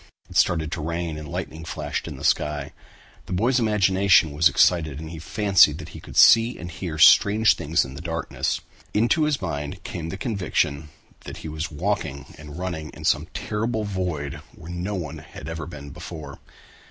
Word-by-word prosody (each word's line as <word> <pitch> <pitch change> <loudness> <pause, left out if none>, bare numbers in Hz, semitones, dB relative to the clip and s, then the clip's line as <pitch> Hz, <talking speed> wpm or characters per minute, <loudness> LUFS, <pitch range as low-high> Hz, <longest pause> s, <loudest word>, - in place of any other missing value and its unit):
It - - -11
started 80 -2 +2
to 85 - -3
rain 85 0 -3
and 75 - -8
lightning 80 +1 -5
flashed 75 -3 -4
in - - -6
the - - -10
sky. 75 -2 0 0.5
The - - -4
boy's 120 +8 +2
imagination 95 -6 +4
was 80 +4 +4
excited 80 -5 +2
and 80 0 -7
he 80 - -7
fancied 100 +3 +4
that - - -9
he - - -10
could - - -10
see 115 +2 +7
and 85 +1 -7
hear 80 -2 -5
strange 105 +7 +6
things 80 +1 0
in 65 - -9
the 70 - -8
darkness. 80 -2 -2 0.3
Into 120 +9 +3
his 150 -2 0
mind 75 -4 -4
came 85 -2 -5
the 95 - -5
conviction 90 - -1 0.4
that - - -7
he - - -3
was 80 +1 -4
walking 75 -4 -2
and 75 0 -10
running 90 -4 -4
in - - -9
some - - +2
terrible 110 +1 -2
void 85 -8 -3
where 85 - -10
no 90 +4 -3
one 80 -4 -5
had 75 - -11
ever 80 -1 -5
been 70 -4 -9
before. 80 -1 -9
85 Hz, 185 wpm, -24 LUFS, 75-95 Hz, 0.5 s, see